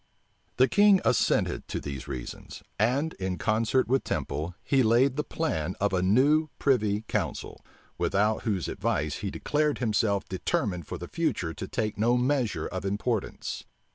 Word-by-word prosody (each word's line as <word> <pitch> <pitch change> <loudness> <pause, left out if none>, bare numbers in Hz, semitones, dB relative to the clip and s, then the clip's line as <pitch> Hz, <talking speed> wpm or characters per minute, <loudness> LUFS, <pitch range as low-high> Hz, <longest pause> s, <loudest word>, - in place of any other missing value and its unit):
The 130 +1 +6
king 205 +2 +5
assented - - +1
to - - -3
these 70 -3 -6
reasons; 60 -1 -7 0.2
and, 135 +9 +1
in 95 -1 -2
concert 115 +4 +1
with 130 +2 +2
Temple, 80 +5 -3
he 135 -2 +3
laid 125 +3 +4
the 150 - -1
plan 90 - -2
of 100 -1 +1
a 90 - +2
new 140 +11 +3
privy 110 -7 +2
council, - - -3 0.4
without 105 +2 +1
whose 100 -6 -1
advice 75 0 -1
he 100 - -3
declared 150 +7 0
himself 105 -4 +1
determined 90 -2 -2
for - - -5
the - - -7
future - - -1
to - - -6
take 105 -1 -2
no 120 +3 +3
measure 125 -2 0
of 95 - -4
importance. 105 +2 -2
110 Hz, 155 wpm, -28 LUFS, 95-130 Hz, 0.4 s, The